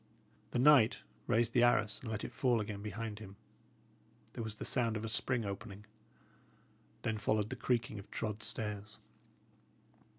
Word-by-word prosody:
The -, -, -2 dB
knight 130 Hz, -3 st, +6 dB, 0.2 s
raised 115 Hz, 0 st, +2 dB
the 120 Hz, -, +4 dB
arras 110 Hz, -4 st, +3 dB
and 115 Hz, -, -6 dB
let 110 Hz, -2 st, -3 dB
it -, -, -5 dB
fall 125 Hz, -3 st, +2 dB
again 105 Hz, -1 st, -4 dB
behind 105 Hz, +1 st, -5 dB
him. 100 Hz, -2 st, -10 dB, 1.0 s
There 115 Hz, -, -4 dB
was 110 Hz, -1 st, -4 dB
the -, -, -6 dB
sound 115 Hz, -4 st, +1 dB
of 110 Hz, -, -4 dB
a -, -, -2 dB
spring 115 Hz, +1 st, +1 dB
opening; 100 Hz, +1 st, -6 dB, 1.2 s
then 110 Hz, -1 st, -1 dB
followed 110 Hz, +1 st, +1 dB
the -, -, -2 dB
creaking 120 Hz, -3 st, 0 dB
of 100 Hz, -, -12 dB
trod 110 Hz, -1 st, -3 dB
stairs. 105 Hz, -1 st, -3 dB
110 Hz, 160 wpm, -35 LUFS, 105-120 Hz, 1.2 s, knight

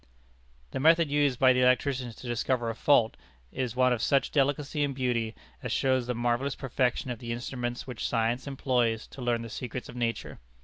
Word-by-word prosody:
The -, -, -3 dB
method 165 Hz, +1 st, +4 dB
used 145 Hz, -3 st, +2 dB
by 130 Hz, 0 st, +6 dB
the 125 Hz, -, +2 dB
electricians 125 Hz, -1 st, +1 dB
to 125 Hz, -, -10 dB
discover 120 Hz, 0 st, 0 dB
a -, -, -8 dB
fault 120 Hz, -3 st, +3 dB, 0.4 s
is 125 Hz, -3 st, -3 dB
one 125 Hz, 0 st, +4 dB
of 120 Hz, -, -2 dB
such 135 Hz, +1 st, +2 dB
delicacy 145 Hz, +1 st, +1 dB
and 140 Hz, -2 st, -1 dB
beauty 120 Hz, -4 st, -1 dB, 0.3 s
as -, -, -4 dB
shows 130 Hz, -2 st, +1 dB
the 125 Hz, -, -1 dB
marvellous 120 Hz, +4 st, 0 dB
perfection 125 Hz, -1 st, -1 dB
of 120 Hz, -, -5 dB
the 115 Hz, -1 st, -5 dB
instruments 120 Hz, 0 st, -4 dB
which 125 Hz, -4 st, -4 dB
science 115 Hz, +3 st, 0 dB
employs 125 Hz, -5 st, 0 dB
to 135 Hz, -, -11 dB
learn 120 Hz, -1 st, 0 dB
the -, -, -6 dB
secrets 125 Hz, 0 st, -6 dB
of -, -, -10 dB
nature. 115 Hz, -1 st, -3 dB
125 Hz, 190 wpm, -28 LUFS, 120-135 Hz, 0.4 s, by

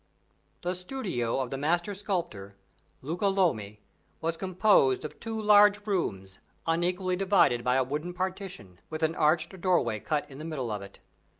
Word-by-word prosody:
The 180 Hz, +1 st, -1 dB
studio 180 Hz, -, -2 dB
of 125 Hz, -, -4 dB
the 135 Hz, -, -3 dB
master 170 Hz, +7 st, +1 dB
sculptor, 175 Hz, -, -4 dB, 0.5 s
Luca 170 Hz, +8 st, -1 dB
Lomi, 110 Hz, -, 0 dB, 0.4 s
was 165 Hz, +1 st, -1 dB
composed 185 Hz, -7 st, +3 dB
of -, -, -8 dB
two 225 Hz, -1 st, -4 dB
large 205 Hz, -1 st, +5 dB
rooms 95 Hz, -, -2 dB, 0.3 s
unequally 180 Hz, +3 st, 0 dB
divided 185 Hz, -11 st, +3 dB
by 125 Hz, +1 st, +2 dB
a 130 Hz, -, +3 dB
wooden 150 Hz, +7 st, -4 dB
partition, 185 Hz, -, -5 dB
with 155 Hz, 0 st, -4 dB
an 160 Hz, 0 st, +2 dB
arched 165 Hz, +4 st, +1 dB
doorway 150 Hz, -, +2 dB
cut 150 Hz, +6 st, -2 dB
in 140 Hz, -1 st, -12 dB
the -, -, -7 dB
middle 135 Hz, -8 st, -3 dB
of 105 Hz, -1 st, -3 dB
it. 100 Hz, 0 st, -11 dB
165 Hz, 160 wpm, -28 LUFS, 130-190 Hz, 0.5 s, large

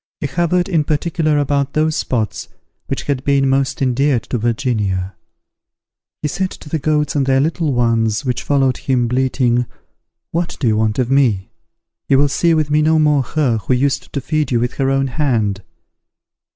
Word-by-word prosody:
He -, -, -3 dB
hovered 175 Hz, +4 st, 0 dB
in 165 Hz, -5 st, +1 dB
particular 155 Hz, 0 st, 0 dB
about 140 Hz, -1 st, 0 dB
those 155 Hz, 0 st, +1 dB
spots 115 Hz, -4 st, -2 dB, 0.4 s
which -, -, -3 dB
had 135 Hz, -2 st, -2 dB
been 140 Hz, -1 st, +2 dB
most 135 Hz, 0 st, 0 dB
endeared 130 Hz, -1 st, +1 dB
to 120 Hz, -, 0 dB
Virginia. 105 Hz, -6 st, -1 dB, 1.1 s
He -, -, +1 dB
said 185 Hz, +5 st, -2 dB
to 150 Hz, -, -12 dB
the 160 Hz, -, -1 dB
goats, 150 Hz, 0 st, 0 dB
and 140 Hz, -2 st, +1 dB
their 135 Hz, 0 st, +3 dB
little 160 Hz, +1 st, 0 dB
ones, 115 Hz, -1 st, +1 dB
which 125 Hz, -1 st, -1 dB
followed 135 Hz, -3 st, +1 dB
him, 125 Hz, -3 st, 0 dB
bleating, 125 Hz, -1 st, +1 dB, 0.6 s
"What 170 Hz, +1 st, -2 dB
do 130 Hz, -, 0 dB
you 110 Hz, -, +3 dB
want 110 Hz, 0 st, 0 dB
of 125 Hz, -1 st, 0 dB
me? 120 Hz, -9 st, +2 dB, 0.6 s
You 135 Hz, -, +5 dB
will 145 Hz, +1 st, +3 dB
see 165 Hz, +4 st, +2 dB
with 155 Hz, -2 st, 0 dB
me 150 Hz, +1 st, +3 dB
no 160 Hz, +1 st, +3 dB
more 150 Hz, -2 st, +3 dB
her 130 Hz, -2 st, 0 dB
who 125 Hz, +5 st, 0 dB
used 135 Hz, +2 st, -1 dB
to 140 Hz, -, -2 dB
feed 155 Hz, 0 st, -1 dB
you 120 Hz, -, +2 dB
with 120 Hz, +2 st, -1 dB
her 135 Hz, -1 st, +1 dB
own 135 Hz, 0 st, +1 dB
hand." 120 Hz, -8 st, -1 dB
135 Hz, 180 wpm, -18 LUFS, 120-150 Hz, 1.1 s, You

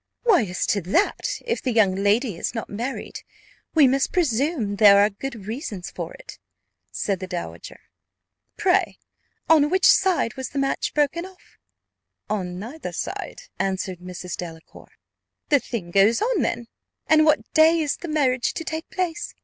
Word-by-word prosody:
"Why, 420 Hz, -, +4 dB
as 180 Hz, -1 st, -2 dB
to 200 Hz, -, +1 dB
that, 360 Hz, -, 0 dB
if 470 Hz, -1 st, -1 dB
the 255 Hz, -, -1 dB
young 215 Hz, -5 st, +3 dB
lady 205 Hz, +3 st, +1 dB
is 195 Hz, -, -4 dB
not 225 Hz, -, -5 dB
married, 240 Hz, +6 st, -5 dB, 0.5 s
we 300 Hz, -4 st, +7 dB
must 270 Hz, +1 st, +1 dB
presume 265 Hz, -, 0 dB
there 205 Hz, -1 st, +8 dB
are 205 Hz, +1 st, +4 dB
good 225 Hz, 0 st, -7 dB
reasons 215 Hz, -, -5 dB
for -, -, -6 dB
it," -, -, -12 dB, 0.5 s
said 195 Hz, -3 st, -2 dB
the 185 Hz, -, -6 dB
dowager. 180 Hz, -2 st, -7 dB, 0.8 s
"Pray, 385 Hz, -2 st, +2 dB, 0.5 s
on 300 Hz, -2 st, +5 dB
which 375 Hz, +2 st, +2 dB
side 360 Hz, -, +4 dB
was 265 Hz, -, -4 dB
the 280 Hz, -, -7 dB
match 275 Hz, 0 st, -1 dB
broken 300 Hz, +3 st, +1 dB
off?" 375 Hz, 0 st, -15 dB, 0.7 s
"On 180 Hz, -4 st, -2 dB
neither 245 Hz, +11 st, -7 dB
side," -, -, -5 dB, 0.2 s
answered 190 Hz, -1 st, -2 dB
Mrs. 180 Hz, -1 st, -7 dB
Delacour. 165 Hz, -2 st, -10 dB, 0.6 s
"The 290 Hz, -3 st, +5 dB
thing 205 Hz, -9 st, -6 dB
goes 200 Hz, +5 st, +4 dB
on 455 Hz, -6 st, +1 dB
then; 240 Hz, 0 st, -1 dB, 0.4 s
and 310 Hz, 0 st, +5 dB
what 305 Hz, -1 st, +1 dB
day 320 Hz, +1 st, +5 dB
is 300 Hz, -3 st, -1 dB
the 345 Hz, -, -7 dB
marriage 265 Hz, -6 st, +1 dB
to 330 Hz, -, -4 dB
take 320 Hz, 0 st, -5 dB
place?" 345 Hz, -2 st, -3 dB
255 Hz, 160 wpm, -23 LUFS, 200-320 Hz, 0.8 s, there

